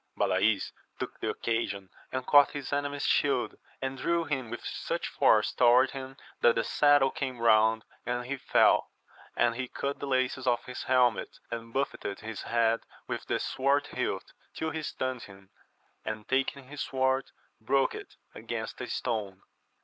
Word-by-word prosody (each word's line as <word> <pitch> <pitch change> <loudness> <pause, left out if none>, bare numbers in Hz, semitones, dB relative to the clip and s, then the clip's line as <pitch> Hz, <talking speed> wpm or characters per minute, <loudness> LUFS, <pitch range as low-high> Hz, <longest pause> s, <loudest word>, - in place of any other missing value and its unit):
Balays 100 +2 +2 0.3
took - - -6
the - - -2
occasion, 100 -5 -2 0.2
and 130 0 -3
caught 145 0 +6
his 145 -1 -5
enemy's 145 0 -1
shield, - - +2 0.3
and 135 0 -3
drew 170 +4 +1
him 135 -7 -3
with - - -7
such - - -3
force - - +3
toward 125 +2 +5
him 135 0 -7 0.2
that 120 - +5
the 115 - +1
saddle 145 -2 +4
came 130 -3 -3
round 110 -1 +4 0.2
and 120 0 -2
he 135 +3 -2
fell, 130 - +3 0.5
and 120 -1 +3
he 130 +2 -4
cut 140 +3 -3
the 140 - -4
laces 130 0 0
of 120 -1 +2
his 125 - -6
helmet, 125 -4 +2
and 115 0 -5
buffetted 120 -6 -2
his 110 -1 -6
head 115 -1 +2 0.3
with - - -4
the - - +1
sword 140 +2 +1
hilt - - -3 0.2
till 160 - -2
he 160 - -3
stunned 130 -4 -3
him, 95 -2 -14 0.5
and 110 -1 -5
taking 135 +1 0
his 140 +3 -8
sword 130 0 +1 0.3
broke 135 +4 +2
it - - -9 0.2
against - - -5
a - - -4
stone. 105 -6 -3
130 Hz, 165 wpm, -29 LUFS, 115-135 Hz, 0.5 s, caught